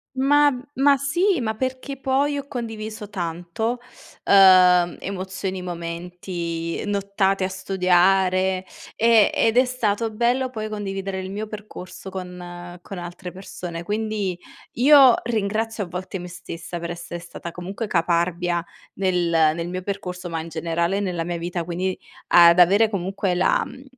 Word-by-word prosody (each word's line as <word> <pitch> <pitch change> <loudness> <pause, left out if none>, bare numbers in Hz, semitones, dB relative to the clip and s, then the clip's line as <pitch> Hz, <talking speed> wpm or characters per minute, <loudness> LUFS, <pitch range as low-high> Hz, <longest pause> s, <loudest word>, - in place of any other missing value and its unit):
Ma 290 +2 +4 0.2
ma 280 +1 +5
sì, 345 +5 +1
ma 220 -2 -2
perché 260 +3 -4
poi 275 +2 +1
ho 280 - -5
condiviso 220 -4 -6
tanto, 175 +6 -3 0.5
uhm, 185 -3 +6
emozioni, 190 -1 -4
momenti, 170 -1 -5
nottate 200 -1 0
a 185 - 0
studiare, 185 0 +2 0.3
ehm, 230 -2 +5
ed 225 +1 +2
è 255 - +6
stato 230 -3 -1
bello 245 +4 0
poi 215 -2 -5
condividere 195 -2 -4
il 190 0 -6
mio 210 +2 -4
percorso 210 -3 -9
con 175 -1 -8
con 195 - -8
altre 175 +1 -7
persone. 180 -2 -7
Quindi 210 -2 -2 0.4
io 265 -1 +7
ringrazio 220 -1 -1
a - - -12
volte 185 +2 -6
me 180 - -7
stessa 175 -1 -7
per 170 0 -5
essere 175 0 -7
stata 170 0 -8
comunque 195 +6 -5
caparbia 170 0 0 0.3
nel 180 -3 +1 0.3
nel 170 0 -4
mio 185 +1 -4
percorso, 180 -2 -5
ma 165 -1 -3
in 165 - -8
generale 170 +3 -1
nella 180 -4 -2
mia 175 0 -3
vita, 170 0 -3
quindi 180 +2 -2 0.3
ad 170 0 +7
avere 200 +6 +6
comunque 195 -1 -2
la 180 +1 +2
mhmm, 260 - -11
190 Hz, 145 wpm, -23 LUFS, 175-220 Hz, 0.5 s, io